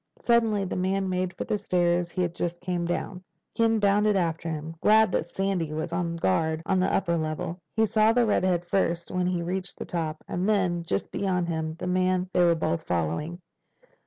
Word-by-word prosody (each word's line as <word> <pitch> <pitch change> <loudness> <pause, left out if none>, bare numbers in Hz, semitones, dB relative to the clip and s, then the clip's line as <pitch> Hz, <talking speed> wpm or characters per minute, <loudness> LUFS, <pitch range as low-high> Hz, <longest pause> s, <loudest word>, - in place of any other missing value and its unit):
Suddenly 225 -4 +2
the 185 - -4
man 190 +1 0
made 185 0 -1
for - - -2
the 210 - -1
stairs 175 -1 +1
he 185 +1 -1
had 175 -1 -2
just 175 0 -3
come 175 -1 -2
down. 180 +1 -3 0.3
Ken 225 -1 +3
bounded 205 0 +3
after 165 -2 -1
him, 160 0 -5
glad 220 -1 +5
that 165 - 0
Sandy 185 -4 -2
was 160 +2 -3
on 170 -1 -1
guard 160 - 0
on 190 -1 +2
the 185 - +2
upper 170 -3 +1
level. 160 +2 -3 0.2
He 220 0 +4
saw 215 +1 +3
the 240 +1 +3
redhead 185 -4 +1
first 170 -2 0
when 180 -1 0
he 180 -2 -1
reached 180 +1 -3
the - - -5
top 160 -2 -3
and 185 +4 -1
then, 185 -5 +1
just - - -2
beyond 180 -3 -1
him, 160 -1 -2
the 175 - -6
man 185 0 +1
they 180 - +4
were 170 -1 +4
both 160 0 -1
following. 90 - -2
180 Hz, 200 wpm, -26 LUFS, 170-195 Hz, 0.3 s, glad